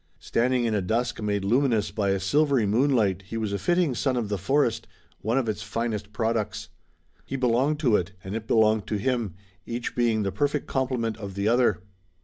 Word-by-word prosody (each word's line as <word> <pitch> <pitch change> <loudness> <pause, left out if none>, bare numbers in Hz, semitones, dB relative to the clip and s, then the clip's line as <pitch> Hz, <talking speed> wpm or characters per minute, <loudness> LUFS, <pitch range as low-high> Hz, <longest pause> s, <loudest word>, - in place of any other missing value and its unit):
Standing 125 +1 +1
in 115 - 0
a 105 - +1
dusk 120 +6 -1
made 100 -2 -1
luminous 115 -1 +2
by 100 -2 0
a 95 0 +1
silvery 140 +4 +2
moonlight 110 -4 +2
he 115 - -4
was 110 -3 -2
a 100 - -1
fitting 175 -5 +2
son 130 +1 0
of 115 -4 -2
the 100 - -1
forest, 135 +3 +1 0.3
one 115 +4 0
of 130 -4 +1
its 110 - -2
finest 110 -3 -3
products. 110 -2 -2 0.5
He 135 - -5
belonged 130 +4 +1
to 120 -8 +4
it, 90 +1 -4
and 95 +3 -5
it 110 0 -5
belonged 110 -2 +3
to - - -1
him, 115 -3 -1 0.3
each 120 0 -4
being 115 -3 +2
the 95 - -1
perfect 145 +3 0
complement 125 -4 -1
of 100 -2 -7
the 100 +1 -1
other. 115 -6 +2
115 Hz, 195 wpm, -26 LUFS, 105-125 Hz, 0.5 s, to